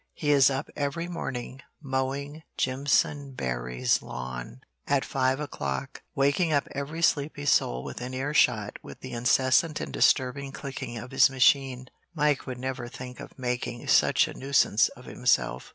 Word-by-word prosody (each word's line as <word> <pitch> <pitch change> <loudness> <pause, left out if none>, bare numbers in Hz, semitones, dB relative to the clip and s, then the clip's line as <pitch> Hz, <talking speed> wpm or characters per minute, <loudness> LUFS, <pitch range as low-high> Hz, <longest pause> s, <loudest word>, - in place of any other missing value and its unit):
He 150 -2 0
is 140 -2 +6
up 135 0 -2
every 145 +4 -2
morning 135 -6 -5 0.2
mowing 140 +2 -3 0.2
Jimpsonberry's 130 - 0
lawn 65 0 -7 0.3
at 140 -1 +2
five 130 0 0
o'clock, 70 - -4
waking 140 +5 +2
up 145 -2 +1
every 150 +4 -4
sleepy 145 -2 +1
soul 60 - +2
within 125 +1 -6
ear 140 +3 -2
shot 110 -8 +2
with - - -12
the - - -7
incessant 130 +6 +2
and - - -5
disturbing 135 +1 +2
clicking 135 -4 -6
of 120 +3 -8
his 135 - +6
machine. 130 -1 +2 0.3
Mike 150 -3 +1
would 130 -1 -5
never 130 -1 -4
think 125 0 -9
of - - -11
making 125 -1 -3
such - - +4
a - - -7
nuisance 135 -5 +3
of - - -13
himself. 60 +1 0
130 Hz, 150 wpm, -27 LUFS, 125-140 Hz, 0.3 s, is